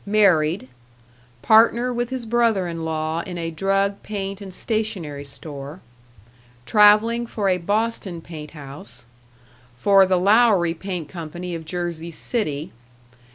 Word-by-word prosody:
Married. 180 -8 +3 0.8
Partner 230 +3 +4
with 240 0 -2
his 260 -2 -3
brother 225 -5 +2
in 165 -1 -5
law 160 0 -2
in 175 0 -7
a 165 -1 -3
drug, 195 +4 0
paint, 200 -1 -5
and 195 -2 -8
stationery 185 -9 -3
store. 145 +2 -7 0.9
Traveling 215 - +5
for 205 -4 -1
a 180 -1 +1
Boston 205 -1 -1
paint 155 -2 -9
house. 135 -5 -10 0.7
For 195 +7 +5
the 185 -1 +3
Lowry 200 -3 +4
Paint 175 -2 -5
Company 175 +1 -7
of 165 -1 -6
Jersey 170 -1 -4
City. 155 - -3
185 Hz, 125 wpm, -22 LUFS, 160-215 Hz, 0.9 s, Traveling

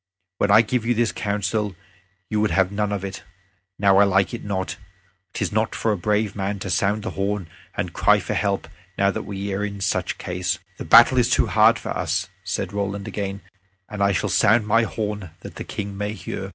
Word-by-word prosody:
When 100 - +2
I 105 +3 +7
gave 120 +1 -1
you 120 +1 +1
this 115 0 +2
counsel 105 0 -2 0.5
you 105 -1 0
would 110 - +2
have 95 -1 +2
none 105 0 -1
of 100 -1 -2
it. 95 0 -6 0.6
Now 100 -1 +4
I 100 - +7
like 95 0 +2
it 120 - -5
not. 95 -2 -3 0.6
'Tis - - -2
not 110 +1 0
for 115 - 0
a - - +1
brave 105 0 +1
man 100 0 -2
to 95 -1 -5
sound 100 +4 +1
the - - -3
horn 100 -2 -2 0.3
and - - -2
cry - - +4
for - - -3
help 100 -1 -1 0.3
now 100 0 +3
that - - -5
we 100 0 -3
are 100 +2 -1
in 100 -1 -4
such 95 - -1
case." 90 -1 -2 0.2
"The - - -5
battle 125 +2 +7
is 120 - +3
too - - +3
hard - - +5
for - - -7
us," 90 +4 -1
said 95 +2 -3
Roland 100 0 -3
again, 100 -1 -4 0.5
"and 105 -1 -6
I 100 0 +4
shall 95 - 0
sound 110 +2 +4
my 115 +2 +4
horn, 105 -3 -4
that - - -10
the - - -5
King 100 -1 -5
may 105 +1 -3
hear." 105 - -6
100 Hz, 215 wpm, -23 LUFS, 95-105 Hz, 0.6 s, I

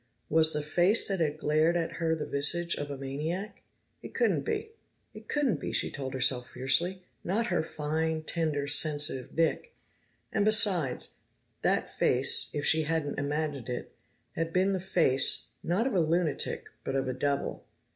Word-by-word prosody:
Was 160 0 +5
the 150 0 0
face 175 +8 +3
that 195 -2 -1
had 155 -2 0
glared 155 +3 +2
at 165 -1 -3
her 160 -1 +1
the 155 - -4
visage 170 +5 +1
of 145 0 -5
a 140 - -5
maniac? 155 +10 -5 0.4
It - - -11
couldn't 470 - +2
be. 445 0 -3 0.4
It 215 0 -12
couldn't 290 -6 0
be, - - -4
she - - 0
told 135 -1 -5
herself 125 -1 +2
fiercely. 175 +8 0 0.2
Not 215 +6 0
her 175 - +2
fine, 160 0 -2
tender, 155 -3 -1
sensitive 145 -3 +3
Nick! 165 - 0 0.6
And 215 - +2
besides, 200 - +3 0.4
that - - 0
face, - - +3
if 145 - -3
she 160 - +4
hadn't 155 -2 -2
imagined 145 -3 -3
it, 125 - -5 0.4
had 165 0 -3
been 185 +3 +2
the 190 - -1
face, 170 -8 +2
not 185 +8 0
of 270 - -1
a 185 - +2
lunatic, 165 -1 0 0.2
but 135 - -3
of 135 -1 -1
a 130 - -1
devil. 140 +2 -2
160 Hz, 165 wpm, -29 LUFS, 145-180 Hz, 0.6 s, Was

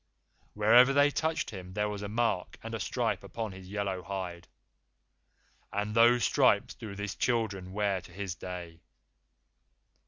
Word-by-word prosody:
Wherever 120 +5 +6
they 145 +1 +5
touched 160 +2 -1
him 90 -3 -8
there 105 +1 0
was 105 -1 -4
a 100 - -4
mark 115 -4 -1
and - - -6
a - - -2
stripe - - -1
upon 110 -3 -5
his 95 0 -11
yellow 100 -2 -2
hide. 90 -3 -5 1.2
AND 105 +1 -2
THOSE 120 +1 +5
STRIPES 95 - +3
DO 105 -3 -8
THIS 105 -1 -4
CHILDREN 105 -6 -1
WEAR 100 -2 0
TO 90 - -15
THIS 95 0 -4
DAY! 85 -2 -8
100 Hz, 150 wpm, -30 LUFS, 95-115 Hz, 1.2 s, Wherever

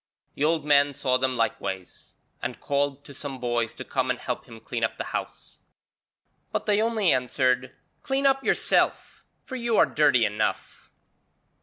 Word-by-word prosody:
The - - -3
old 155 -1 +2
man 145 -1 +4
saw 130 -2 +1
them 130 0 0
likewise, 95 -5 -3 0.3
and - - -4
called 140 0 -1
to 140 - -10
some 135 -2 -6
boys 120 -2 -1
to - - -7
come 130 -1 -1
and 125 - 0
help 125 - -4
him 115 -3 -12
clean 115 0 -4
up 110 - 0
the - - -3
house. - - -6 0.9
But - - -2
they 210 0 +3
only 220 -4 +2
answered, 125 0 0 0.3
'Clean 270 +1 -1
up 270 0 +3
yourself, - - +1 0.2
for 260 - -7
you 235 -3 0
are - - +7
dirty 145 -6 +3
enough.' 105 +1 -3
135 Hz, 165 wpm, -26 LUFS, 125-155 Hz, 0.9 s, are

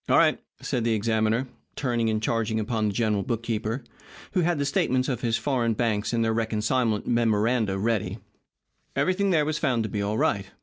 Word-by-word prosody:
"All - - +5
right," - - +4 0.2
said 120 - -2
the 115 -1 +2
examiner, 110 +3 +1 0.3
turning 120 -4 0
and 110 0 -1
charging 110 -1 0
upon 110 0 0
the - - 0
general 105 -3 +1
bookkeeper, 115 +3 -2 0.5
who 185 - +1
had 175 -1 +1
the 140 - 0
statements 130 -2 +1
of 125 -4 -2
his 115 -2 +1
foreign 120 -5 0
banks 105 -2 0
and 115 -1 +1
their 110 - +1
reconcilement 110 0 0
memoranda 115 -2 +1
ready. 105 -2 -1 0.8
Everything 195 +2 +1
there 160 -5 +3
was 155 0 -1
found 125 -7 +1
to 110 - -3
be 105 +1 -2
all 105 +2 -1
right. 100 -3 +1
115 Hz, 185 wpm, -26 LUFS, 110-125 Hz, 0.8 s, All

